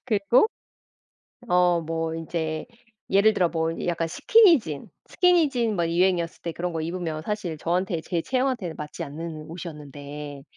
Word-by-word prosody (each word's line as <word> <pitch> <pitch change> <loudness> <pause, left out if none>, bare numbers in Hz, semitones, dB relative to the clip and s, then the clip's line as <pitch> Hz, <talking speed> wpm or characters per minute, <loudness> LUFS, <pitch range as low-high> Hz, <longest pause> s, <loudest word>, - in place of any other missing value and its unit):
그리고 230 - +3 1.0
어 180 -1 +4
뭐 165 0 -3
인제 160 -1 -3 0.4
예를 200 +3 +5
들어 180 -4 +3
뭐 165 -1 -1 0.2
약간 170 -1 0
스키니진. 325 - +4 0.2
스키니진 295 - +3
뭐 170 -1 +1
유행이었을 170 0 +1
때 170 - -3
그런 175 +2 -3
거 160 - -1
입으면 165 -2 -3
사실 195 -4 -3
저한테 175 +1 -1
제 170 +1 -1
체형한테는 250 -9 -1
맞지 150 +3 -6
않는 155 +1 -7
옷이었는데 150 -3 -8
170 Hz, 310 characters per minute, -25 LUFS, 160-200 Hz, 1.0 s, 예를